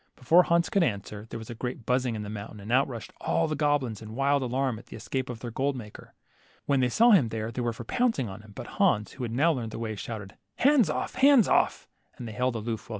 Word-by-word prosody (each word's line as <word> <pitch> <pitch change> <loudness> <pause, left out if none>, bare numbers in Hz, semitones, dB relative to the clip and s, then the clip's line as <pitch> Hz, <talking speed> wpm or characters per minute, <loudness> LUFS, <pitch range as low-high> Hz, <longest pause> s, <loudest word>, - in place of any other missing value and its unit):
Before 165 +8 +5
Hans 170 -1 +1
could 195 - +3
answer, 105 - -2
there - - -5
was 110 +1 -8
a - - -4
great 125 0 -5
buzzing 125 -1 +1
in 105 - -4
the 105 - -6
moun 105 0 -7
tain, 105 - -11
and 105 +3 -7
out 130 +3 +4
rushed 120 -5 -8
all 165 0 +1
the 155 - -2
goblins 145 -7 0
in 110 0 -9
wild 140 +1 +2
alarm 130 -2 -1
at - - -16
the - - -10
escape 125 +4 -4
of 115 -3 -6
their 120 - -5
gold 135 +4 -1
maker. 105 -5 -10 0.5
When 140 -2 +2
they 125 -1 +2
saw 235 - +5
him 155 - +5
they 110 -1 -3 0.2
were 120 -1 0
for 115 - -8
pouncing 240 - 0
upon 100 0 -8
him, 105 -1 -16
but - - -7 0.2
Hans, 105 0 +3
who 130 - -7
had 115 - -3
now 145 +8 +3
learned 120 -5 -4
the - - -7
way, 110 -1 -4
shouted, 105 -1 -7 0.2
Hands 265 - +4
off, 150 - -2
hands 270 -6 +5
off - - +2
125 Hz, 240 wpm, -27 LUFS, 110-145 Hz, 0.5 s, Before